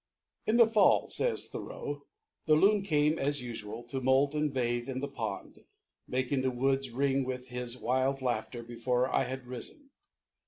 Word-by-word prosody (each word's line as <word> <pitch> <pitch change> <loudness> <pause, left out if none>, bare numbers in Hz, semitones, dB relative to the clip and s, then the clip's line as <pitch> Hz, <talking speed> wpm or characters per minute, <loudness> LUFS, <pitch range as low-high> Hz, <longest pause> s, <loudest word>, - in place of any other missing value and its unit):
"In 220 - +3
the 235 - +8
fall," 215 -2 +4
says 485 -2 +3
Thoreau, 145 0 -6 0.4
"the 155 - +6
Loon 200 +6 +4
came, 155 -4 +1
as 145 -1 0
usual, 115 -1 -5
to 130 +3 -5
moult 135 +2 +3
and 150 -1 0
bathe 120 -1 -1
in 130 -1 -3
the 140 - -3
pond, 110 -7 -6 0.5
making 130 +1 0
the 130 - +1
woods 135 +1 0
ring 135 +2 +1
with 130 0 -5
his 125 0 -3
wild 130 +2 0
laughter 120 -2 -3
before 125 +2 -1
I - - +2
had 130 0 -6
risen. 200 - -9
130 Hz, 165 wpm, -30 LUFS, 125-145 Hz, 0.5 s, the